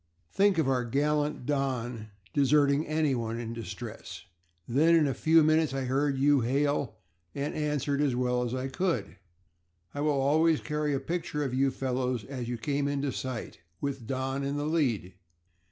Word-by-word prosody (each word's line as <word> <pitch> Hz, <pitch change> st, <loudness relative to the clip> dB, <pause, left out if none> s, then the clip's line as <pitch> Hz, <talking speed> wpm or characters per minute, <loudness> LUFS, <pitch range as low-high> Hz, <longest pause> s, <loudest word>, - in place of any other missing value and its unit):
Think 200 Hz, -2 st, +3 dB
of 160 Hz, -4 st, +2 dB
our 130 Hz, -2 st, +1 dB
gallant 145 Hz, +2 st, 0 dB
Don 125 Hz, -5 st, -2 dB, 0.3 s
deserting 145 Hz, +1 st, +3 dB
anyone 130 Hz, -7 st, 0 dB
in 115 Hz, -1 st, -5 dB
distress. 115 Hz, -5 st, -7 dB, 0.4 s
Then 155 Hz, +8 st, +4 dB
in 160 Hz, -2 st, +4 dB
a 135 Hz, -, 0 dB
few 160 Hz, +3 st, +4 dB
minutes 155 Hz, -2 st, +2 dB
I 135 Hz, -, -1 dB
heard 135 Hz, +2 st, 0 dB
you 140 Hz, +1 st, +4 dB
hail 140 Hz, +2 st, 0 dB, 0.4 s
and 145 Hz, +2 st, -2 dB
answered 145 Hz, -1 st, -1 dB
as 140 Hz, -4 st, +1 dB
well 125 Hz, 0 st, +1 dB
as 120 Hz, 0 st, -2 dB
I 130 Hz, +1 st, -2 dB
could. 135 Hz, -, -2 dB, 0.8 s
I 145 Hz, -, -3 dB
will 145 Hz, -2 st, +1 dB
always 155 Hz, +3 st, +3 dB
carry 150 Hz, -1 st, -1 dB
a -, -, 0 dB
picture 150 Hz, 0 st, -3 dB
of 135 Hz, -3 st, -3 dB
you 135 Hz, +1 st, +3 dB
fellows 125 Hz, -3 st, -2 dB
as 125 Hz, -3 st, -5 dB
you 120 Hz, -, -2 dB
came 140 Hz, +5 st, -1 dB
into 140 Hz, -1 st, -1 dB
sight, 130 Hz, -2 st, -5 dB, 0.2 s
with 135 Hz, -5 st, -4 dB
Don 135 Hz, +1 st, -2 dB
in 140 Hz, +1 st, -2 dB
the 145 Hz, -, -2 dB
lead. 130 Hz, -, 0 dB
140 Hz, 170 wpm, -29 LUFS, 125-150 Hz, 0.8 s, Then